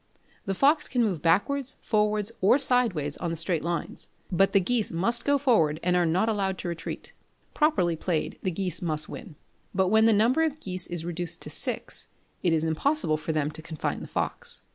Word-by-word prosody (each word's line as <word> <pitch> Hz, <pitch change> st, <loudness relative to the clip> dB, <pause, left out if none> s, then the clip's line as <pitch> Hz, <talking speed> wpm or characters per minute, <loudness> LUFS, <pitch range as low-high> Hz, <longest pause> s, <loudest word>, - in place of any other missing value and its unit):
The 195 Hz, -, -1 dB
fox 290 Hz, -, +3 dB
can 245 Hz, -2 st, +1 dB
move 185 Hz, -9 st, -1 dB
backwards, 265 Hz, +11 st, +1 dB
forwards, 210 Hz, 0 st, 0 dB
or 200 Hz, +7 st, +5 dB
sideways 235 Hz, -, +1 dB
on 175 Hz, -, -3 dB
the 165 Hz, -, -2 dB
straight 165 Hz, 0 st, 0 dB
lines; 170 Hz, 0 st, -4 dB, 0.2 s
but 195 Hz, +2 st, +3 dB
the 200 Hz, -, +4 dB
geese 220 Hz, +4 st, 0 dB
must 230 Hz, +8 st, +1 dB
go 285 Hz, 0 st, +3 dB
forward, 190 Hz, -, +2 dB
and 180 Hz, +1 st, +2 dB
are 175 Hz, -1 st, +3 dB
not 185 Hz, +7 st, +1 dB
allowed 195 Hz, -4 st, 0 dB
to -, -, -5 dB
retreat. 170 Hz, -1 st, -6 dB, 0.4 s
Properly 300 Hz, -, +2 dB
played, 160 Hz, 0 st, -2 dB
the 190 Hz, -, -1 dB
geese 180 Hz, -1 st, -3 dB
must 155 Hz, -3 st, +1 dB
win; 190 Hz, -10 st, -9 dB, 0.4 s
but 190 Hz, -1 st, +2 dB
when 220 Hz, +2 st, +5 dB
the -, -, +5 dB
number 230 Hz, +8 st, +3 dB
of 310 Hz, -2 st, 0 dB
geese 185 Hz, -, -3 dB
is 175 Hz, -2 st, -4 dB
reduced 175 Hz, -1 st, -3 dB
to -, -, -6 dB
six, -, -, -1 dB, 0.3 s
it 175 Hz, -, +2 dB
is 160 Hz, -1 st, +1 dB
impossible 165 Hz, -, +1 dB
for 155 Hz, -, -4 dB
them 155 Hz, -1 st, -1 dB
to 160 Hz, -, -7 dB
confine 160 Hz, -1 st, -4 dB
the -, -, -7 dB
fox. -, -, -2 dB
185 Hz, 200 wpm, -26 LUFS, 165-230 Hz, 0.4 s, or